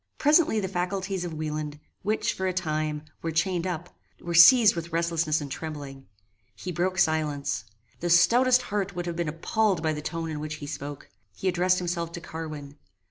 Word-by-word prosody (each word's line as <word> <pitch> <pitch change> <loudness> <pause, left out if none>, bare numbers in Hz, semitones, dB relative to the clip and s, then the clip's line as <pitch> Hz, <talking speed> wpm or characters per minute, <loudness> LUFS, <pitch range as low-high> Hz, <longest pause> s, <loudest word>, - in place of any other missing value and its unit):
Presently 295 -6 +4
the 195 - -2
faculties 190 +1 -2
of 170 -2 -5
Wieland, 150 -1 -4 0.2
which, 215 +2 0
for 190 - -2
a 185 - 0
time, 155 -4 -2 0.2
were 165 - -2
chained 175 +2 0
up, 175 -1 -5 0.2
were 170 - -5
seized 210 +5 +8
with 170 0 -5
restlessness 165 -2 +1
and 140 -2 -6
trembling. 145 -4 -7 0.5
He 185 - -6
broke 185 +2 -1
silence. 150 -7 0 0.3
The 175 - -2
stoutest 250 +9 +5
heart 200 -4 -2
would 175 -1 -3
have 170 -1 -3
been 170 -2 -1
appalled 185 +3 0
by 160 -1 +1
the 150 - -5
tone 165 +1 -4
in 150 - -4
which 155 +1 -4
he 145 - -8
spoke. 145 -1 -7 0.2
He 190 - -3
addressed 180 0 +3
himself 170 -2 -2
to 170 - -5
Carwin. 155 -4 -7
170 Hz, 185 wpm, -27 LUFS, 155-185 Hz, 0.5 s, seized